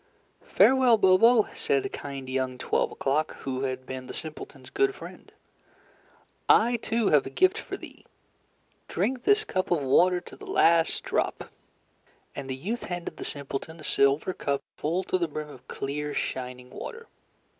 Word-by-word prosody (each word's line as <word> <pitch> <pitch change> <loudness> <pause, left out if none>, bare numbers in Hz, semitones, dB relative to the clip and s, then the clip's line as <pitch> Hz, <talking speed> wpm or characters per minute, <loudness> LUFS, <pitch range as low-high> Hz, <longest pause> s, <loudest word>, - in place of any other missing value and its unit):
"Farewell, 260 -3 +6
Bobo," 210 +4 +5
said 135 -1 0
kind 140 -2 -6
young 130 -1 -2
Twelve - - 0
O'Clock, 145 +3 -1
who 130 -1 -3
had 130 0 -4
been 130 -1 -7
the - - -6
simpleton's 155 -1 -7
good 400 0 +1
friend. - - -11 1.2
"I, 240 +2 +5
too, 230 -1 0
have 145 -3 +4
a - - -4
gift 375 +4 +3
for - - -6
thee. - - -13 0.8
Drink 255 -1 -1
this 415 +1 +4
cup 185 - -2
of 165 -5 +1
water 180 +7 +4
to - - -13
the 410 - -12
last 170 - +3
drop." - - -2 0.8
And 135 -1 -6
the 130 - -2
youth 205 - -4
handed 175 -1 -5
the - - -6
simpleton 145 +3 -5
a - - -11
silver 140 +6 +2
cup 140 -4 -2
full 170 +5 -1
to 185 - 0
the 170 - +1
brim 150 0 -6
of 130 -3 -14
clear 145 +2 -4
shining 125 -1 -4
water. 465 -1 -8
155 Hz, 160 wpm, -27 LUFS, 135-225 Hz, 1.2 s, Farewell